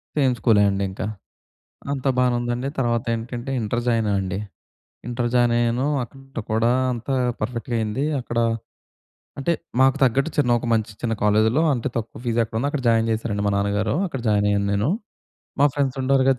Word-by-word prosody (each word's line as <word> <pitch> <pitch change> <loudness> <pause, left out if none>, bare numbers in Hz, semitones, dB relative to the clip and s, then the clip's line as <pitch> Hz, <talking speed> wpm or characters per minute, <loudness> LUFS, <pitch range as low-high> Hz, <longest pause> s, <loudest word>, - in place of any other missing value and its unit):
Same 135 -4 +3
స్కూలే 110 -4 +4
అండి 100 0 -1
ఇంకా. 95 - -4 0.9
అంతా 135 -1 -1
బానే 125 -1 +3
ఉందండి. 120 +2 -2
తర్వాత 120 -3 +1
ఏంటంటే 120 +3 -5
ఇంటర్ 115 +2 -1
జాయిన్ 115 -2 +2
ఆయనండి. 95 -1 -1 0.7
ఇంటర్ 120 0 -1
జాయిన్ 120 -1 +4
అయ్యాను. 120 +3 +1 0.2
అక్కడ 135 -1 -8
కూడా 115 +2 +3 0.2
అంతా 120 +3 -3 0.3
పర్ఫెక్ట్‌గా 120 +2 -2
అయింది. 110 +6 -1 0.2
అక్కడ 120 -1 -4 1.0
అంటే 140 +5 +1 0.3
మాకు 130 0 +5
తగ్గట్టు 135 +5 +3
చిన్న 140 -5 +2
ఒక 120 - -6
మంచి 110 -1 0
చిన్న 115 -1 0
కాలేజ్‌లో 110 +7 +3
అంత 120 -4 -2
తక్కువ 115 -1 -4
ఫీజ్ 120 -1 0
ఎక్కడుందో 115 +5 -2
అక్కడ 145 -3 -3
జాయిన్ 115 0 +3
చేశారండి 110 -2 -2
మా 100 - +2
నాన్నగారు. 100 +3 0
అక్కడ 135 -7 -5
జాయిన్ 105 -1 +3
అయ్యాను 100 0 +1
నేను. 100 +5 +1 0.7
మా 145 - +6
ఫ్రెండ్స్ 140 -2 0
ఉంటారు 130 0 +3
కదా! 130 - +3
120 Hz, 170 wpm, -23 LUFS, 110-130 Hz, 1.0 s, మా